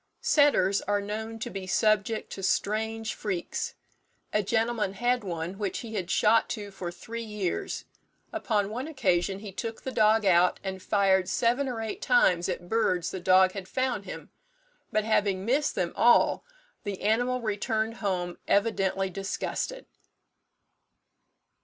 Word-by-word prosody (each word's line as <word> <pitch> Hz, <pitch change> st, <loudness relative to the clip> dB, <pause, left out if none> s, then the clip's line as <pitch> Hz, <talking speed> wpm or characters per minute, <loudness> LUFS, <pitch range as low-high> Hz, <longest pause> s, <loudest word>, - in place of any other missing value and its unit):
Setters 240 Hz, -10 st, +4 dB
are 205 Hz, 0 st, +2 dB
known 220 Hz, +2 st, -5 dB
to 220 Hz, -, -5 dB
be 190 Hz, -1 st, -6 dB
subject 215 Hz, +2 st, +1 dB
to 195 Hz, -, -6 dB
strange 220 Hz, +3 st, -1 dB
freaks. 190 Hz, -5 st, -3 dB, 0.6 s
A 210 Hz, -, +3 dB
gentleman 225 Hz, -1 st, 0 dB
had 240 Hz, +3 st, +1 dB
one 175 Hz, +1 st, -4 dB
which 200 Hz, -3 st, -2 dB
he 230 Hz, -2 st, -8 dB
had 190 Hz, -4 st, -3 dB
shot 225 Hz, +4 st, +3 dB
to 205 Hz, -1 st, -7 dB
for 180 Hz, -2 st, -5 dB
three 230 Hz, +6 st, -7 dB
years. 210 Hz, -5 st, -3 dB, 0.5 s
Upon 210 Hz, -3 st, 0 dB
one 250 Hz, +6 st, -4 dB
occasion 195 Hz, -, +1 dB
he 210 Hz, -2 st, -7 dB
took 225 Hz, +4 st, -5 dB
the 260 Hz, -, -3 dB
dog 215 Hz, -2 st, +3 dB
out, 180 Hz, -1 st, +4 dB
and 190 Hz, -1 st, -4 dB
fired 190 Hz, -2 st, +2 dB
seven 245 Hz, +6 st, +1 dB
or 235 Hz, -3 st, -4 dB
eight 220 Hz, -, -5 dB
times 190 Hz, -8 st, +3 dB
at 175 Hz, -1 st, -4 dB
birds 180 Hz, -5 st, +1 dB
the 190 Hz, -, -4 dB
dog 185 Hz, +1 st, +5 dB
had 190 Hz, -1 st, -7 dB
found 255 Hz, -5 st, -1 dB
him; -, -, -8 dB, 0.6 s
but 215 Hz, -1 st, +1 dB
having 200 Hz, -3 st, +1 dB
missed 280 Hz, +5 st, +1 dB
them 175 Hz, -2 st, -1 dB
all, 240 Hz, 0 st, +4 dB, 0.4 s
the 205 Hz, -3 st, -5 dB
animal 245 Hz, +4 st, +2 dB
returned 220 Hz, +1 st, -1 dB
home, 180 Hz, -4 st, -2 dB
evidently 195 Hz, -2 st, +1 dB
disgusted. 195 Hz, -, -3 dB
210 Hz, 145 wpm, -28 LUFS, 190-225 Hz, 0.6 s, dog